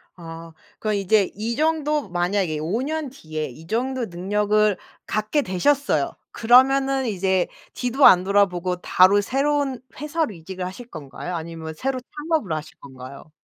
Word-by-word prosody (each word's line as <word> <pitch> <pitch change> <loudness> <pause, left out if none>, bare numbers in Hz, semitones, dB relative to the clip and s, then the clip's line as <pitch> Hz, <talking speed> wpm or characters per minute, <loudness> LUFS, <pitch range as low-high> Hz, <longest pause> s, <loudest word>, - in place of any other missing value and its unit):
아. 165 -1 -10 0.3
그럼 215 -1 -1
이제 200 0 +2
이 225 +4 -3
정도 300 -4 0
만약에 175 -2 0
5 175 +10 -1
년 305 +1 -3
뒤에 155 - -5
이 155 +6 -13
정도 250 +4 -1
능력을 210 +2 +1 0.3
갖게 215 +8 0
되셨어요. 280 +8 +1 0.2
그러면은 270 +3 +4
이제 190 -4 +1 0.3
뒤도 255 +2 +2
안 180 -1 +8
돌아보고 185 -2 +1
바로 190 +4 +5
새로운 275 +2 0 0.2
회사로 300 -3 -1
이직을 180 +2 -7
하실 190 +7 -8
건가요? 155 - -7
아니면 160 -1 -6
새로 260 +9 -2 0.3
창업을 310 - 0
하실 155 0 -7
건가요? 135 +2 -11
205 Hz, 305 characters per minute, -23 LUFS, 175-265 Hz, 0.3 s, 안